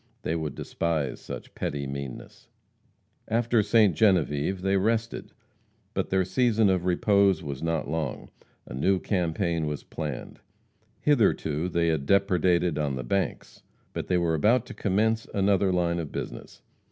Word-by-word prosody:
They 80 Hz, -, -1 dB
would 80 Hz, -4 st, -3 dB
despise 80 Hz, -5 st, -2 dB
such -, -, -8 dB
petty 70 Hz, -1 st, -3 dB
meanness. 70 Hz, -2 st, -7 dB, 0.8 s
After 115 Hz, 0 st, +2 dB
Ste. 105 Hz, -2 st, +4 dB
Genevieve 90 Hz, -1 st, +2 dB
they 95 Hz, 0 st, +2 dB
rested. 115 Hz, +4 st, -1 dB, 0.6 s
But -, -, -2 dB
their 95 Hz, -1 st, +2 dB
season 110 Hz, +1 st, +3 dB
of 90 Hz, -1 st, 0 dB
repose 100 Hz, 0 st, +3 dB
was 70 Hz, -3 st, -5 dB
not 80 Hz, 0 st, -1 dB
long. 80 Hz, +1 st, -4 dB, 0.3 s
A -, -, -9 dB
new 95 Hz, +9 st, +2 dB
campaign 85 Hz, -4 st, -1 dB
was 75 Hz, -1 st, -4 dB
planned. 75 Hz, -5 st, -6 dB, 0.6 s
Hitherto 90 Hz, -, +2 dB
they 85 Hz, -1 st, +1 dB
had 75 Hz, -4 st, -1 dB
depredated 90 Hz, -4 st, +2 dB
on 70 Hz, -3 st, -1 dB
the 65 Hz, -, -4 dB
banks. 95 Hz, +10 st, -2 dB, 0.3 s
But -, -, -4 dB
they 90 Hz, -, +2 dB
were 85 Hz, -2 st, +1 dB
about 115 Hz, +10 st, +3 dB
to -, -, -9 dB
commence 110 Hz, +3 st, 0 dB
another 100 Hz, -1 st, +3 dB
line 85 Hz, -1 st, +1 dB
of 80 Hz, -4 st, -5 dB
business. -, -, -7 dB
90 Hz, 145 wpm, -27 LUFS, 80-100 Hz, 0.8 s, Ste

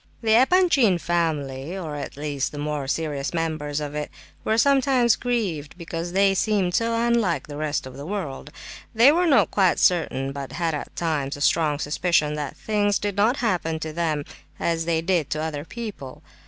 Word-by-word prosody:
The 220 Hz, -1 st, +3 dB
Epanchin 265 Hz, -, +4 dB
family, 160 Hz, -2 st, -2 dB
or 160 Hz, -5 st, -5 dB
at 145 Hz, -, -6 dB
least 145 Hz, -2 st, -2 dB
the 145 Hz, -, -8 dB
more 145 Hz, -1 st, -3 dB
serious 145 Hz, 0 st, -2 dB
members 155 Hz, -3 st, -2 dB
of 145 Hz, -1 st, -5 dB
it, 150 Hz, 0 st, -3 dB, 0.3 s
were 220 Hz, -, +1 dB
sometimes 260 Hz, -3 st, +4 dB
grieved 195 Hz, -, -2 dB
because 170 Hz, 0 st, -5 dB
they 195 Hz, 0 st, +4 dB
seemed 195 Hz, -2 st, +1 dB
so 230 Hz, +2 st, +1 dB
unlike 230 Hz, -6 st, +1 dB
the 145 Hz, -, -8 dB
rest 150 Hz, -2 st, -2 dB
of 130 Hz, -1 st, -9 dB
the 140 Hz, -, -7 dB
world. 170 Hz, -9 st, -5 dB, 0.5 s
They 235 Hz, +6 st, +7 dB
were 350 Hz, +3 st, +2 dB
not 280 Hz, -5 st, +4 dB
quite 190 Hz, -3 st, +3 dB
certain, 145 Hz, -6 st, +1 dB
but 140 Hz, -1 st, -7 dB
had 165 Hz, +1 st, -1 dB
at 150 Hz, -, -6 dB
times 145 Hz, -5 st, -2 dB
a -, -, -10 dB
strong 150 Hz, -1 st, +2 dB
suspicion 150 Hz, +1 st, +1 dB
that 150 Hz, -2 st, -5 dB
things 205 Hz, -2 st, +1 dB
did 205 Hz, -1 st, -3 dB
not 220 Hz, +6 st, +2 dB
happen 165 Hz, -6 st, 0 dB
to 155 Hz, -1 st, -4 dB
them 155 Hz, -3 st, -1 dB, 0.3 s
as 165 Hz, -1 st, 0 dB
they 165 Hz, -1 st, +1 dB
did 170 Hz, -5 st, +1 dB
to 155 Hz, -, -2 dB
other 155 Hz, -2 st, -3 dB
people. 205 Hz, -, -8 dB
165 Hz, 180 wpm, -24 LUFS, 150-205 Hz, 0.5 s, They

